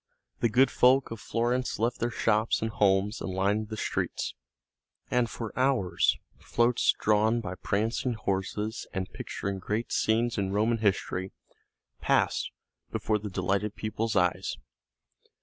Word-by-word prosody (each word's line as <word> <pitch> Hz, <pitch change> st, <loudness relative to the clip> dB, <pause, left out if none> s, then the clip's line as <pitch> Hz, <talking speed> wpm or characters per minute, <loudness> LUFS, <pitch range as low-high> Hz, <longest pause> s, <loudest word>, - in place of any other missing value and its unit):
The 115 Hz, -, +2 dB
good 130 Hz, +5 st, +4 dB
folk 130 Hz, +1 st, +4 dB
of 115 Hz, -, -5 dB
Florence 120 Hz, +3 st, -1 dB
left 120 Hz, +3 st, 0 dB
their 120 Hz, -, 0 dB
shops 110 Hz, -1 st, +1 dB
and 110 Hz, 0 st, -2 dB
homes 100 Hz, 0 st, +2 dB
and -, -, -3 dB
lined 100 Hz, +3 st, 0 dB
the 110 Hz, -, -5 dB
streets, -, -, -2 dB, 0.8 s
and 125 Hz, -2 st, +2 dB
for 115 Hz, -2 st, -6 dB
hours 130 Hz, -8 st, +2 dB, 0.2 s
floats 120 Hz, +1 st, +2 dB
drawn 110 Hz, +2 st, +3 dB
by 95 Hz, -5 st, -4 dB
prancing 110 Hz, +6 st, -1 dB
horses 105 Hz, +2 st, -2 dB
and 95 Hz, -1 st, -3 dB
picturing 100 Hz, -1 st, -4 dB
great 105 Hz, +5 st, -2 dB
scenes 115 Hz, +1 st, +1 dB
in 95 Hz, -1 st, -1 dB
Roman 110 Hz, +3 st, +1 dB
history 95 Hz, -2 st, 0 dB, 0.7 s
passed -, -, +1 dB, 0.4 s
before 110 Hz, -1 st, 0 dB
the 105 Hz, 0 st, -5 dB
delighted 100 Hz, +3 st, -1 dB
people's 110 Hz, +1 st, -2 dB
eyes. 90 Hz, -1 st, +1 dB
110 Hz, 135 wpm, -28 LUFS, 100-115 Hz, 0.8 s, good